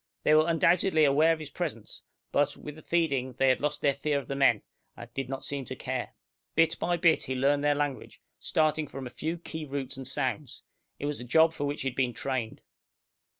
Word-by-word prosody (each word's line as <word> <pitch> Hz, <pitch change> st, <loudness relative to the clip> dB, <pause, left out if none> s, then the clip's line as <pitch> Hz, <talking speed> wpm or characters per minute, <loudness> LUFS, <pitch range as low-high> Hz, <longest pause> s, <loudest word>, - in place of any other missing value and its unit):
They 150 Hz, -, +4 dB
were 155 Hz, +1 st, +5 dB
undoubtedly 170 Hz, 0 st, +3 dB
aware 150 Hz, +4 st, +4 dB
of 165 Hz, -, +1 dB
his 155 Hz, -2 st, -8 dB
presence, -, -, -5 dB, 0.3 s
but, 145 Hz, -, +1 dB
with 150 Hz, -, -8 dB
the 155 Hz, -, -12 dB
feeding, 140 Hz, -8 st, 0 dB
they 135 Hz, +2 st, +3 dB
had 130 Hz, -, +3 dB
lost 150 Hz, 0 st, -1 dB
their 140 Hz, -, +3 dB
fear 145 Hz, +1 st, -1 dB
of 140 Hz, -, -5 dB
the 140 Hz, -, -3 dB
men, 135 Hz, -6 st, +3 dB, 0.3 s
and 120 Hz, 0 st, -11 dB
did 135 Hz, -2 st, -4 dB
not 135 Hz, 0 st, -4 dB
seem 140 Hz, -1 st, -3 dB
to 130 Hz, -, -6 dB
care. 130 Hz, -1 st, -4 dB, 0.4 s
Bit 165 Hz, +1 st, +3 dB
by 175 Hz, 0 st, 0 dB
bit 165 Hz, -1 st, +3 dB
he 130 Hz, -, -3 dB
learned 140 Hz, +2 st, +2 dB
their 145 Hz, 0 st, +3 dB
language, 145 Hz, -2 st, -3 dB, 0.2 s
starting 155 Hz, -1 st, +1 dB
from 135 Hz, 0 st, -7 dB
a 125 Hz, -, -7 dB
few 160 Hz, +5 st, -3 dB
key 160 Hz, -1 st, -7 dB
roots 135 Hz, -2 st, -4 dB
and 135 Hz, -1 st, -7 dB
sounds. 135 Hz, -1 st, -3 dB, 0.3 s
It -, -, -5 dB
was 145 Hz, 0 st, -2 dB
a -, -, -6 dB
job 160 Hz, +6 st, +4 dB
for 145 Hz, -, -3 dB
which 145 Hz, -1 st, -3 dB
he 135 Hz, -, 0 dB
had 125 Hz, -, -12 dB
been 125 Hz, -2 st, +1 dB
trained. 120 Hz, -1 st, -3 dB
145 Hz, 225 wpm, -29 LUFS, 130-155 Hz, 0.4 s, were